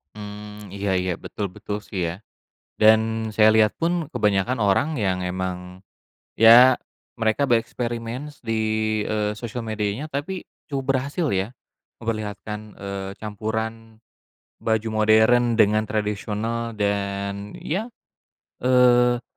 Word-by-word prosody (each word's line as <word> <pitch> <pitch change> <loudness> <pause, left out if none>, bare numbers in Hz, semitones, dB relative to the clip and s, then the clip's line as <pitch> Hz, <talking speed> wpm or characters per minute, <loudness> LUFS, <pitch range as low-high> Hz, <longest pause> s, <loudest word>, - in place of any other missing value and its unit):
Mmm, 105 -1 -9
iya 100 0 -3
iya, 90 0 -1
betul 105 - -4
betul 105 - -4
sih 95 - -4
ya, - - -4 0.7
dan 110 0 +4
saya 110 0 +6
liat 110 -1 +5
pun 165 +1 +2 0.2
kebanyakan 105 +4 +1
orang 100 +8 +3
yang 95 -3 0
emang, 90 0 -4 0.6
ya 120 +3 +8 0.4
mereka 115 +6 +2
bereksperimen 120 +2 -1 0.2
di, 115 -1 -1 0.5
eee, 105 -1 0
sosial 120 0 -5
medianya 110 +3 -2
tapi 175 +7 -4 0.2
cukup 135 -2 -3
berhasil 140 +6 -1
ya, 95 +2 0 0.5
memperlihatkan, 105 -2 -4 0.2
eee, 100 -1 -5
campuran 110 +1 -3 0.9
baju 110 0 0
modern 110 +3 +4
dengan 110 +1 +4
tradisional, 110 +2 -2
dan 100 0 -2
ya, 190 +8 -2 0.7
eee, 125 -1 +4
110 Hz, 110 wpm, -23 LUFS, 105-120 Hz, 0.9 s, ya